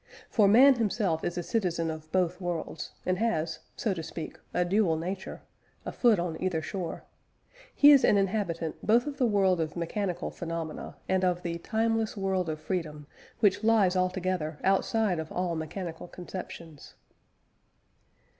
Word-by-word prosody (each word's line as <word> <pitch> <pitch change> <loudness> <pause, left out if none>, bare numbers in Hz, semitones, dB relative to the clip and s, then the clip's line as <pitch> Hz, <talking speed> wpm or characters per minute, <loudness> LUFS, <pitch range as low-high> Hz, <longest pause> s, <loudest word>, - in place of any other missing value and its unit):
For 210 -4 +4
man 255 +7 +8
himself 205 -8 0
is 175 - -2
a 175 - -2
citizen 170 -6 -1
of 155 0 -9
both 180 0 0
worlds, 175 -2 -4 0.2
and 185 0 0
has 165 -8 -1 0.2
(so 215 - -1
to 170 - -5
speak) 160 0 -7
a 180 - +1
dual 180 -3 +2
nature, 185 +4 -5 0.4
a - - -3
foot 235 -4 +4
on 170 -2 -3
either 185 -3 0
shore. 170 +2 -5 0.7
He 290 +1 +8
is 280 -2 +7
an 205 - +5
inhabitant 185 -5 -1
both 235 +3 +4
of 290 -2 -5
the 250 - +3
world 190 -5 +2
of 155 -1 -3
mechanical 175 +1 -2
phenomena, 165 -2 -5
and 190 0 +1
of 180 -1 +1
the 170 -1 -3
"timeless 225 +2 0
world 190 -3 0
of 155 -1 -3
freedom," 155 -3 -4 0.4
which 205 0 +3
lies 215 -5 +4
altogether 185 -4 -1
outside 195 -1 +2
of 160 0 -6
all 180 -1 -1
mechanical 165 +2 -5
conceptions. 170 -4 -9
185 Hz, 155 wpm, -28 LUFS, 165-205 Hz, 0.7 s, man